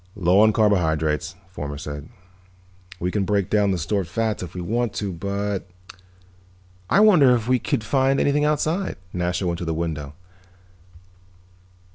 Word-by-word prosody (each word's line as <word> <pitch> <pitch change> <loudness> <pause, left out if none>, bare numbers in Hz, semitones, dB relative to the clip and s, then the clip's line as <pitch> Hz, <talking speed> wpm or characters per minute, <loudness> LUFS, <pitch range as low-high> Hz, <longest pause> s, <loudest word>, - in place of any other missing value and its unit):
"Low 95 -1 +3
on 110 +1 +6
carbohydrates," 85 -7 +1 0.2
Fomar 75 -5 -6
said. 75 +1 -7 0.9
"We 90 +1 -1
can 100 0 0
break 100 -1 0
down 105 -1 +3
the 95 - 0
stored 90 +3 -1
fats 110 +3 -2
if 90 - -8
we - - -4
want 115 +5 -1
to, 100 -3 -3
but 100 +2 -3 0.6
" 90 0 -31
"I - - +4
wonder 155 -13 +6
if 115 -1 -3
we 125 0 +3
could 110 - -1
find 135 +2 +2
anything 145 +1 +2
outside." 155 +5 0 0.2
Nasha 90 +1 -1
went 85 -1 -1
to 85 - -4
the 80 0 -2
window. 75 -3 -4
95 Hz, 155 wpm, -23 LUFS, 85-110 Hz, 0.9 s, on